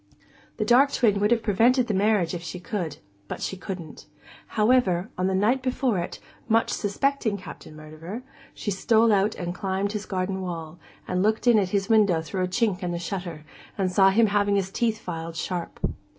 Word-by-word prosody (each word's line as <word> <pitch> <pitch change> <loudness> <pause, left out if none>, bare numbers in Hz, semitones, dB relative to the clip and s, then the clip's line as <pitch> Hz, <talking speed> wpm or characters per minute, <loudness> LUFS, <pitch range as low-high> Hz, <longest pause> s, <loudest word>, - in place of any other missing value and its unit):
The 215 - -1
dark 260 +5 +5
twin 210 -5 +2
would 205 +1 +2
have 235 -1 +2
prevented 235 +5 +3
the 215 - -2
marriage 200 -3 +2
if 175 - -4
she 175 +2 -6
could, 175 -4 -4 0.3
but - - -5
she - - -3
couldn't; 180 -5 -8 0.4
however, 215 -4 +2
on 185 +1 0
the 190 - 0
night 225 +7 +2
before 255 -5 0
it, 170 - -5 0.3
much 225 +1 +3
suspecting 220 +1 0
Captain 180 -4 -11
Murderer, 155 +9 -8 0.3
she 205 - -3
stole 220 +3 +3
out 200 +2 +2
and 175 -1 -4
climbed 195 +2 -2
his 210 -1 -5
garden 190 0 -2
wall, 165 -2 -6 0.3
and 180 0 0
looked 215 +4 +1
in 235 -3 +6
at 190 -3 0
his 195 0 0
window 210 -7 +4
through 185 +3 -3
a - - 0
chink 200 -1 0
in 180 - -2
the 170 - -2
shutter, 170 -3 -5 0.3
and 190 -2 0
saw 195 +1 +5
him 225 +4 +4
having 205 -1 +2
his 190 -1 -1
teeth 225 +1 0
filed 165 -4 -6
sharp. 175 +1 -4
195 Hz, 195 wpm, -25 LUFS, 180-220 Hz, 0.4 s, in